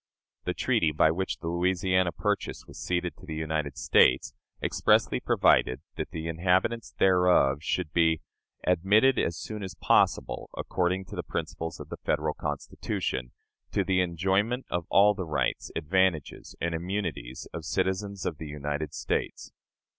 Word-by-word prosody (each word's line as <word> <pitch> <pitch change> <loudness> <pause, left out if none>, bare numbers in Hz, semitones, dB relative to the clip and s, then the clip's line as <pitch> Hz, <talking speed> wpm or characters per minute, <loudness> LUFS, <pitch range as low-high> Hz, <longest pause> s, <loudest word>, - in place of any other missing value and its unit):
The - - -1
treaty 80 - +2
by 80 +1 +4
which 95 +3 -2
the 85 - -7
Louisiana 90 +1 +2
territory 105 +2 -1
was - - -11
ceded 90 -1 -1
to - - -13
the 80 - -4
United 80 -2 -2
States 65 +1 +4 0.3
expressly - - +2
provided 65 - +3
that - - -4
the 80 +1 -5
inhabitants 90 +7 +1
thereof 90 -7 +4
should 85 -1 -2
be 80 -2 +3 0.5
"admitted, 100 +9 +4
as 85 -1 0
soon 105 -1 -6
as 95 -1 -6
possible, - - +2
according 90 +1 -1
to - - -9
the - - -2
principles 80 0 -5
of - - -9
the - - -6
Federal 75 0 0
Constitution, 65 -4 -3 0.4
to - - +2
the 95 -1 +2
enjoyment 95 +8 0
of 85 -1 -2
all 105 +2 +6
the 95 -4 -5
rights, 75 - -1
advantages, 85 -1 0
and 85 0 -1
immunities 85 -8 -4
of 85 - -5
citizens 95 +3 -1
of 80 -3 -3
the 80 - -6
United 75 +1 -4
States." - - -3
85 Hz, 150 wpm, -28 LUFS, 80-95 Hz, 0.5 s, all